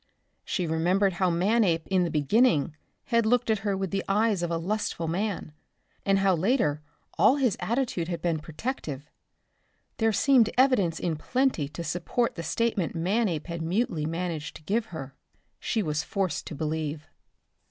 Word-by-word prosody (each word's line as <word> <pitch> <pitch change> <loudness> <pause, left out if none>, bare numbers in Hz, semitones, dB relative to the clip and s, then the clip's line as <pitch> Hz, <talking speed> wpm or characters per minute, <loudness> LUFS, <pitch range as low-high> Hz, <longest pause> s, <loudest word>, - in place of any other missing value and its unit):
She 180 - -2
remembered 180 +5 +2
how 185 +1 +1
Manape 175 -1 +2
in 185 -2 +2
the - - -1
beginning 155 - +2 0.4
had 230 0 +5
looked 240 +1 +2
at 215 - +1
her 200 -1 -1
with 190 -2 -3
the 195 -1 -1
eyes 210 -1 +2
of 175 - -1
a 170 - 0
lustful 175 -1 -2
man 180 -2 -2 0.5
and 195 0 +3
how 195 -1 +3
later 170 - +1 0.4
all 255 - +6
his 260 -7 +1
attitude 235 -8 -1
had 170 -1 -3
been 165 -3 0
protective. 155 - -5 0.9
There 225 -1 +2
seemed 245 0 +4
evidence 235 -11 +3
in 165 -3 -1
plenty 250 - 0
to 170 - -6
support 180 +9 -1
the 165 - -6
statement 200 +2 -1
Manape 180 -1 0
had 170 -1 -5
mutely 165 -3 0
managed 165 -2 -3
to - - -12
give 215 +7 0
her. 135 -7 -7 0.5
She 220 - -1
was 150 -2 -1
forced 190 -5 -2
to 155 - -6
believe. 155 0 -3
180 Hz, 165 wpm, -27 LUFS, 160-220 Hz, 0.9 s, all